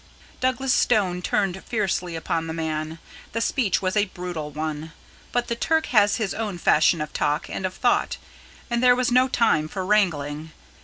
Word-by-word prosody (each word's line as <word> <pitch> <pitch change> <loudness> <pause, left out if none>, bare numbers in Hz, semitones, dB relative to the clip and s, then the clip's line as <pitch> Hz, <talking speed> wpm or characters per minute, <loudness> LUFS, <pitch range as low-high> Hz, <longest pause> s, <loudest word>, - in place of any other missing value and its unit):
Douglas 260 +1 +1
Stone 190 -6 +2
turned 190 0 -1
fiercely 190 -6 -1
upon 165 0 -2
the 160 - -4
man. 160 0 -3 0.4
The 230 - -1
speech 230 -5 0
was 185 +1 0
a 210 -1 +3
brutal 175 -5 -6
one. 155 +1 -5 0.4
But 245 0 0
the 235 - -1
Turk 320 +6 +1
has 205 -2 +5
his 215 -5 -2
own 210 -5 -3
fashion 165 0 +3
of 150 0 -5
talk 150 0 0
and 190 - -2
of 185 - -10
thought, 245 - +1 0.5
and 235 -1 -1
there 250 -1 +6
was 250 -1 0
no 255 +1 +5
time 225 -12 +2
for 190 +3 -4
wrangling. 160 -7 0
185 Hz, 175 wpm, -24 LUFS, 160-230 Hz, 0.5 s, there